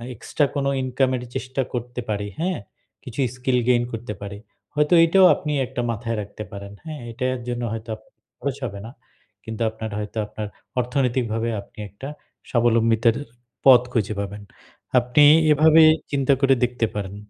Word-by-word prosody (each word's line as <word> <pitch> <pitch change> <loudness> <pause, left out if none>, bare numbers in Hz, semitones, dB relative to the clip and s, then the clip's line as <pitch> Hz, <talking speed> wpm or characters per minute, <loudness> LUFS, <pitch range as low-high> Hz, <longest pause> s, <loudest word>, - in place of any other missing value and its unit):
Extra 145 +6 0
কোন 140 -1 0 0.2
ইনকামের 130 0 0
চেষ্টা 130 +3 -2
করতে 125 0 -4
পারি, 105 -1 -2
হ্যাঁ? 180 +1 -1 0.4
কিছু 125 +2 -9 0.2
স্কিল 125 0 +1
gain 120 -1 +4
করতে 115 -1 -5
পারি। 100 0 -6 0.4
হয়তো 150 +2 +2
এটাও 185 +3 +5
আপনি 150 - -4 0.2
একটা 125 -1 -4
মাথায় 115 0 -3
রাখতে 105 +1 -8
পারেন, 100 0 -8
হ্যাঁ? 155 -3 -7
এটা 130 +1 -2
জন্য 120 0 -3
হয়তো 115 +1 -7
আপ 110 - -18 0.4
খরচ 140 -1 -2
হবে 100 -2 -8
না। - - -9 0.5
কিন্তু 110 0 -3
আপনার 110 0 -6
হয়তো 105 +2 -6
আপনার 105 0 -6 0.3
অর্থনৈতিকভাবে 120 -3 0
আপনি 120 +3 -18
একটা 120 +8 -9 0.4
স্বাবলম্বিতের 115 -1 +3
এ - - -16 0.4
পথ 125 -3 +9
খুঁজে 110 -3 0
পাবেন, 100 +1 -5 0.6
আপনি 125 +5 +3 0.3
এভাবে 155 +2 +6 0.3
চিন্তা 140 -1 +2
করে 135 -1 +5
দেখতে 125 -1 +1
পারেন। 100 -1 -4
120 Hz, 155 wpm, -23 LUFS, 110-135 Hz, 0.6 s, পথ